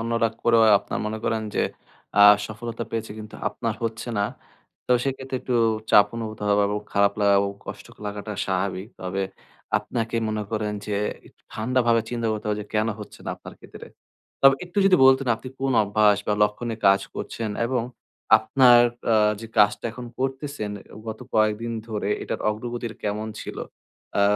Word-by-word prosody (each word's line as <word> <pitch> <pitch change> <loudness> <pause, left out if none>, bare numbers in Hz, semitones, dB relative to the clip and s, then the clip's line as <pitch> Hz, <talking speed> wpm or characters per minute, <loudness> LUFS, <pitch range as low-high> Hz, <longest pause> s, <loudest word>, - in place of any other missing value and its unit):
অন্যরা 115 0 +1
করেও 115 -1 +5 0.2
আপনার - - -5
মনে 110 +1 -3
করেন 110 -1 0
যে - - +1 0.6
আ - - +3 0.3
সফলতা 115 +1 -6
পেয়েছে 115 -1 -3
কিন্তু 105 0 -9
আপনার 115 -3 -3
হচ্ছে 115 +1 -4
না, - - +2 0.6
তো 125 - +3
সেক্ষেত্রে 135 -1 -3
একটু 125 - -2 0.4
চাপ 105 0 +7
অনুভূত 110 -2 -5
হওয়া 105 0 +4
এবং 105 0 -1
খারাপ 100 0 +3
লাগা 100 -1 +4
এবং 100 - -1
কষ্ট - - -8 0.2
লাগাটা 105 +1 -5
স্বাভাবিক। 95 +1 -2
তবে 95 +1 -2 0.6
আপনাকে 115 -1 -3
মনে 110 0 -2
করেন 105 -1 -1
যে 105 - -2 0.3
একটু - - -22
ঠান্ডাভাবে 120 0 +2
চিন্তা 115 -2 -2
করতে 110 0 -5
হবে 105 - 0
যে - - -13
কেন 110 +1 +2
হচ্ছে 105 - -10
না - - -3
আপনার - - -12
ক্ষেত্রে। - - -12 0.6
তবে 135 0 +8
একটু 180 +3 -4
যদি 190 -2 +6
বলতেন 135 0 +5
আপনি 130 - -9
কোন 135 0 +1
অভ্যাস 105 0 +3
বা - - +2
লক্ষ্যে 105 +3 0
নিয়ে 110 -1 -5
কাজ 100 0 +5
করছেন 115 -2 -4 0.2
এবং 125 -1 0 0.6
আপনার 120 +2 +6 0.3
আ - - +5 0.3
যে 115 - -7
কাজটা 105 +2 +4
এখন 125 0 -8
করতেছেন 135 -4 -3 0.4
গত 110 0 -5 0.2
কয়েকদিন 110 +2 +1 0.2
ধরে 105 -2 -2
এটার - - -4
অগ্রগতির 120 +1 -5
কেমন 105 +1 -2
ছিল? - - -7 0.6
অ্যা 100 - +3
110 Hz, 170 wpm, -24 LUFS, 105-120 Hz, 0.6 s, তবে